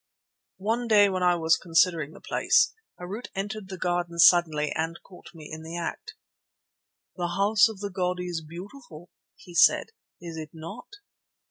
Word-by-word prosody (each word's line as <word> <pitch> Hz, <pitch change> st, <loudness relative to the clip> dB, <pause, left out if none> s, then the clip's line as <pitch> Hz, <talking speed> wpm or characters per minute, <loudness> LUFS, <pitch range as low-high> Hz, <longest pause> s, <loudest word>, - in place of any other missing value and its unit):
One 225 Hz, +5 st, -1 dB
day 205 Hz, -2 st, +5 dB
when 185 Hz, -1 st, -2 dB
I 180 Hz, -1 st, +4 dB
was 165 Hz, -1 st, +2 dB
considering 165 Hz, -3 st, +1 dB
the -, -, -13 dB
place, 475 Hz, -, +2 dB, 0.3 s
Harût 195 Hz, +7 st, -6 dB
entered 200 Hz, 0 st, -5 dB
the 190 Hz, -, -6 dB
garden 175 Hz, -1 st, -2 dB
suddenly 165 Hz, -3 st, +5 dB
and 165 Hz, +1 st, -2 dB
caught 180 Hz, -, -15 dB
me 155 Hz, -2 st, -10 dB
in 160 Hz, -, -7 dB
the 165 Hz, +2 st, -7 dB
act. 170 Hz, -, -5 dB, 1.0 s
"The 175 Hz, -1 st, -2 dB
House 210 Hz, +2 st, +4 dB
of 210 Hz, -3 st, -9 dB
the 205 Hz, -1 st, -4 dB
god 180 Hz, -1 st, -1 dB
is 175 Hz, -2 st, -4 dB
beautiful," 175 Hz, -, -11 dB, 0.2 s
he 175 Hz, -, -15 dB
said, -, -, +4 dB, 0.3 s
"is 170 Hz, -2 st, -8 dB
it 155 Hz, -1 st, -6 dB
not?" 165 Hz, +9 st, -9 dB
175 Hz, 160 wpm, -26 LUFS, 165-200 Hz, 1.0 s, day